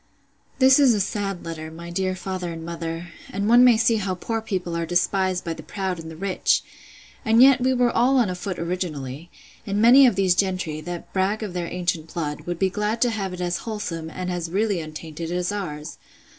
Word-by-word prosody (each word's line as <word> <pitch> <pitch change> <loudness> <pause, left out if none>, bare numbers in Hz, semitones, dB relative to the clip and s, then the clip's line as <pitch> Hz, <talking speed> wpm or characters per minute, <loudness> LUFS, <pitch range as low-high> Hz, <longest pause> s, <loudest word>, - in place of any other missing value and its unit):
This 265 +1 +6
is 265 -5 +5
a - - 0
sad 195 -2 -2
letter, 160 -1 -6
my 170 +2 -9
dear 185 +1 -1
father 185 -1 -4
and 165 -1 -7
mother; 165 0 -5 0.2
and 200 +2 -2
one 240 +2 +7
may 245 -3 +6
see 225 0 +3
how 190 -3 -2
poor 225 +5 -3
people 185 -6 -3
are 170 - -1
despised 180 +2 +1
by 165 - -3
the 160 - -9
proud 185 +2 -4
and 160 0 -8
the 160 - -9
rich! 190 +3 +1 0.6
and 225 +1 +3
yet 260 0 +7
we 260 +1 +3
were 245 -2 +2
all 260 +3 +3
on 240 -4 +4
a 185 - -2
foot 180 0 -5
originally: 165 -4 -4 0.4
And 200 +1 -1
many 250 +5 +8
of 235 - +2
these 190 -2 +3
gentry, 180 -4 -1
that 175 +1 -7
brag 200 +3 0
of 200 -4 -5
their 175 -1 -3
ancient 170 -3 -3
blood, 150 -3 -4
would 175 -1 -2
be 190 +1 +1
glad 210 +3 -1
to 245 - +2
have 200 -4 -3
it 180 0 -6
as 175 0 -1
wholesome, 180 -8 -5
and 180 +2 -4
as 175 -2 -3
really 200 +1 0
untainted, 160 +1 -7
as 180 +1 -1
ours! 155 -7 -5
185 Hz, 215 wpm, -23 LUFS, 170-210 Hz, 0.6 s, many